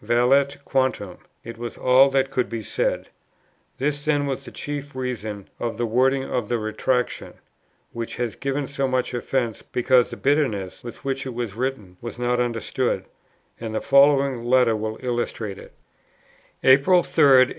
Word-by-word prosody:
Valeat 125 +5 +3
quantum, 130 -8 -1 0.2
it 115 0 -9
was 120 -1 -6
all 130 +2 +5
that 135 0 +1
could 125 -2 0
be 115 -1 -4
said. - - -1 0.7
This 145 +2 -1
then 145 -2 +2
was 135 -1 -4
a - - -8
chief 145 -1 -6
reason 110 -6 -4
of 115 -2 -3
that 120 - 0
wording 130 +4 +2
of 125 -5 -3
the 120 - +1
Retractation, 120 +3 -1 0.6
which 115 -1 -5
has 120 -4 -3
given 140 +1 -2
so 140 -1 -1
much 130 -1 -1
offence, 120 -2 -2
because 125 0 +2
the - - -7
bitterness, 125 -10 0
with 120 +2 -10
which 135 0 -2
it 125 - -6
was 120 -5 -3
written, 110 -6 -4
was 120 0 -7
not 125 0 0
understood; 120 -3 -1 0.5
and 110 -1 -5
the - - +1
following 140 -3 +4
letter 120 -2 +4
will 110 +1 -3
illustrate 120 -5 -3
it: - - -13 0.9
"April 140 +7 +6
3, - - -6
1844. 130 -2 +7
125 Hz, 165 wpm, -23 LUFS, 115-135 Hz, 0.9 s, 1844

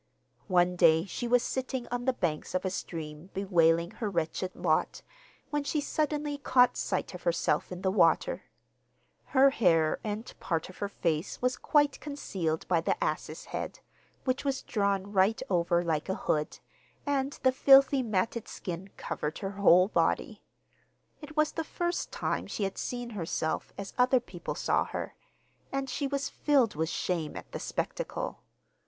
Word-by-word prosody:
One 180 -2 +3
day 160 -1 +5
she 235 +4 -4
was 245 0 +4
sitting 260 -1 -3
on 245 0 -3
the 260 - +3
banks 165 -6 -2
of 185 - 0
a 190 - 0
stream 160 -2 -6
bewailing 170 -3 +3
her 220 - -3
wretched 175 +1 -2
lot, - - 0 0.5
when 295 -1 0
she 300 +2 -1
suddenly 295 0 -1
caught 250 -2 +4
sight - - -2
of - - -8
herself - - 0
in 180 0 -6
the 190 - +2
water. 190 - +2 0.8
Her 275 -1 +5
hair 165 - +3
and 215 +1 -4
part 165 -1 -2
of 185 - -13
her 200 - -2
face 165 -3 -2
was 250 0 +1
quite 290 -2 +2
concealed 190 - -3
by 170 -3 +2
the - - 0
ass's - - -3
head, - - -5 0.5
which 255 0 0
was 275 -2 -1
drawn 200 -2 -1
right 195 +3 +3
over 175 -1 +2
like 160 0 -1
a 190 - 0
hood, 150 0 0 0.5
and 280 -1 0
the 260 - +5
filthy 270 +1 +6
matted 225 0 -1
skin 180 +2 -6
covered 150 +1 -3
her 195 -1 -4
whole 185 -2 +5
body. - - 0 0.8
It 300 +1 -11
was 305 0 +3
the 325 - -3
first 345 +2 -2
time - - -2
she 210 - -3
had 195 0 -2
seen 245 -1 -4
herself 165 -5 -2
as 200 -1 -6
other 250 +1 +5
people 180 -7 -6
saw - - +1
her, - - -5 0.6
and 275 0 -2
she 280 +2 -2
was 280 0 -1
filled 275 -7 +2
with 160 +1 -1
shame 165 -5 -2
at - - -10
the - - -5
spectacle. - - -3
205 Hz, 165 wpm, -30 LUFS, 175-270 Hz, 0.8 s, filthy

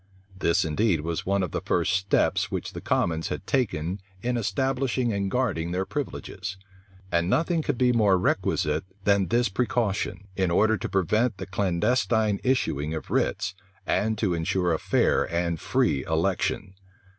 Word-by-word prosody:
This 90 -1 +2
indeed 85 +1 +1
was 85 +2 -3
one 100 0 +2
of 90 - -3
the - - -2
first - - +1
steps 95 +1 +1
which - - -4
the - - -6
commons 80 -1 0
had - - -5
taken 95 - -1 0.2
in 125 +1 0
establishing 125 +2 0
and 100 -1 -1
guarding 95 -8 0
their 90 +2 -1
privileges; 100 -6 -5 0.5
and 85 +1 +1
nothing 165 - +2
could 145 -4 -2
be 125 0 +3
more 105 -5 +4
requisite 75 -4 0 0.2
than 100 -2 +3
this 120 +6 +2
precaution, 100 -2 -1
in 95 -2 +1
order 110 +6 +3
to 100 - -4
prevent 105 +4 +1
the - - -5
clandestine 105 +3 +1
issuing 80 - 0
of 80 - -7
writs, 95 -1 0 0.3
and 110 +1 +1
to 100 -4 +1
insure 85 +1 0
a 80 - 0
fair - - +2
and 85 -1 0
free 80 - +1
election. 95 +3 -1
95 Hz, 155 wpm, -26 LUFS, 85-115 Hz, 0.5 s, more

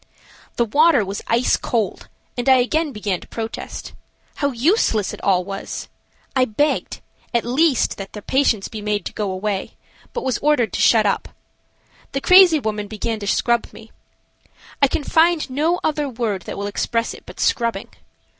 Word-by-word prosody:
The 235 - +2
water 285 0 +4
was 195 +1 -5
ice 235 +2 +3
cold, 220 -5 -2 0.3
and 245 +1 0
I 260 - +8
again 295 +5 +1
began 205 -6 -2
to - - -13
protest. 225 -1 -6 0.4
How 285 - +1
useless 245 - +1
it - - -9
all 185 -2 +2
was! 195 0 -6 0.5
I 260 - +4
begged, 290 +7 -1 0.3
at 235 - +1
least, 270 +2 +2
that 195 -1 -8
the 210 - -8
patients 260 -7 +1
be 220 -2 -7
made 210 0 -2
to - - -5
go 210 -2 -2
away, 190 +1 -3 0.4
but 475 - -4
was 260 - -1
ordered 285 -9 +2
to - - -1
shut 220 -2 +5
up. 200 - 0 0.8
The 275 - 0
crazy 365 -3 +7
woman 210 -4 -3
began 220 +1 -3
to 205 - -6
scrub 235 +3 +1
me. 225 0 -14 0.9
I 280 - +6
can 290 - -2
find 330 +2 +3
no 315 +6 +1
other 300 -2 0
word 225 -7 -3
that - - -5
will 200 - -3
express 230 +3 -1
it - - -13
but - - -12
scrubbing. 230 -4 0
235 Hz, 175 wpm, -21 LUFS, 210-285 Hz, 0.9 s, I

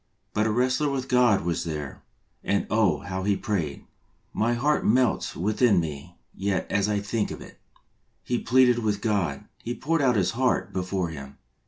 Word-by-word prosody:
But 105 +1 +1
a - - +1
wrestler 130 +6 +1
with 135 -2 -3
God 125 -8 +3
was 85 -1 -1
there, 75 -4 -5 0.4
and 100 - 0
oh, 100 -10 +2
how 95 0 -4
he 100 0 +1
prayed! 85 -10 -3 0.5
My 115 +2 +1
heart 150 +5 +1
melts 125 +1 +2
within 105 +2 +2
me 80 +1 -5 0.2
yet 95 -1 -1
as 100 +1 +1
I 105 -1 +1
think 105 +2 -2
of - - -7
it. - - -13 0.6
He 120 -1 -1
pleaded 125 -1 +4
with 105 -3 -1
God, 100 -10 -1 0.2
he 120 +1 -4
poured 165 +2 0
out 130 -3 +3
his 95 -4 +2
heart 115 -5 0
before 90 -1 -2
Him. 70 -3 -9
105 Hz, 175 wpm, -26 LUFS, 90-120 Hz, 0.6 s, pleaded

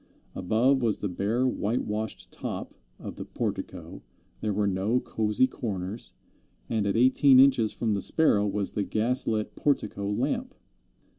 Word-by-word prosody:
Above 120 +8 +2
was 110 -4 +1
the 105 - -3
bare 105 +7 -1
white 120 -1 -1
washed 110 +1 -4
top - - -6 0.2
of - - -8
the - - -5
portico, - - -5 0.4
there 110 - -2
were 105 +1 0
no 100 +5 +1
cosy 110 +1 +1
corners, 105 -4 -5 0.5
and 110 -3 -1
at 100 - 0
eighteen 130 +2 +6
inches 130 -5 +5
from 110 -3 -1
the 100 - -1
Sparrow 105 - +3
was 100 -1 -2
the 105 - -2
gas 120 +6 0
lit 110 -1 -1
portico 105 -8 -1
lamp. 145 - -2
110 Hz, 150 wpm, -27 LUFS, 100-125 Hz, 0.5 s, eighteen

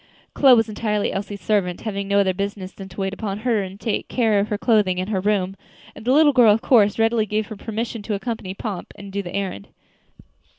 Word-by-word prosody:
Chloe 265 -3 +6
was 225 -2 +2
entirely 210 -1 -1
Elsie's 200 0 -5
servant, 190 -5 0
having 200 -2 -4
no 200 0 +2
other 190 -2 +2
business 195 0 -4
than 195 0 -10
to 190 +2 -7
wait 195 0 -2
upon 200 -1 -4
her 230 -3 +1
and 190 +1 -7
take 220 -2 -2
care 225 -5 +2
of 200 - 0
her 210 - -2
clothing 205 -5 +2
and 185 +2 -3
her 190 -3 0
room; 195 -2 0 0.4
and - - -11
the 250 - +2
little 295 +1 +5
girl, 240 -4 +6
of 215 +2 +1
course, 210 -5 +4
readily 225 -1 +2
gave 215 +1 -1
her 215 - -6
permission 225 +2 -4
to 210 0 -3
accompany 200 -3 -5
Pomp 200 -3 -6
and 200 -1 -10
do 200 +1 -2
the 175 -1 -7
errand. 190 - -4
205 Hz, 225 wpm, -22 LUFS, 195-225 Hz, 0.4 s, Chloe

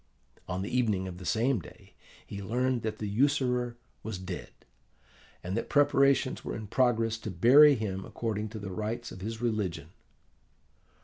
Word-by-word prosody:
On 95 +1 -3
the 105 - -4
evening 105 -7 +1
of 90 -1 -7
the 90 - -7
same 115 - +2
day 85 - -15 0.3
he 100 - -7
learned 125 +4 0
that 110 -1 -3
the 110 - -4
usurer 125 +1 +1 0.2
was 110 -3 -5
dead, 95 -1 -6 0.9
and 90 +2 -3
that 115 - -3
preparations 140 -2 +3
were - - -4
in 110 - -6
progress 115 0 +1
to 110 - -5
bury 135 - +7
him 95 -4 -3
according 110 -1 -3
to 110 - -8
the 100 -2 -6
rites 110 +4 -4
of 95 - -10
his 110 +3 -5
religion. 100 -9 -2
110 Hz, 165 wpm, -29 LUFS, 100-125 Hz, 0.9 s, bury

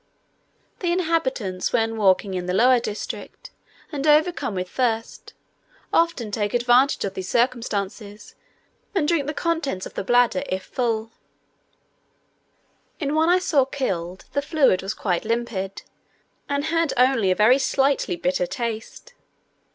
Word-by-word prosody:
The 350 -2 0
inhabitants, 270 - -1
when 225 -1 +1
walking 195 -2 +2
in 180 -1 -3
the 180 - -1
lower 250 +4 +5
district, 215 -2 -7 0.4
and 290 -1 -3
overcome 300 - +2
with 185 0 -3
thirst, 230 +1 -2 0.6
often 330 -10 +1
take 205 +1 -1
advantage 245 +2 +3
of 195 - -4
this 185 -1 -6
circumstance, 215 -4 -2 0.6
and 315 -6 +1
drink 310 -4 +1
the 300 - -2
contents 305 - -2
of - - -9
the - - -4
bladder 245 +5 +3
if 185 0 -2
full: 225 -1 -2 1.9
in 285 -2 -1
one 320 +2 +3
I 360 - +5
saw 355 -7 +2
killed, 190 -10 -4
the 285 - +1
fluid 285 - +2
was 195 +3 -4
quite 180 -4 -1
limpid, 225 -4 -3 0.7
and 285 0 0
had 330 -1 +1
only 250 -5 +3
a 185 - +3
very 230 +7 +5
slightly 275 -8 +1
bitter 180 +1 -1
taste. 235 - -5
240 Hz, 135 wpm, -23 LUFS, 200-285 Hz, 1.9 s, lower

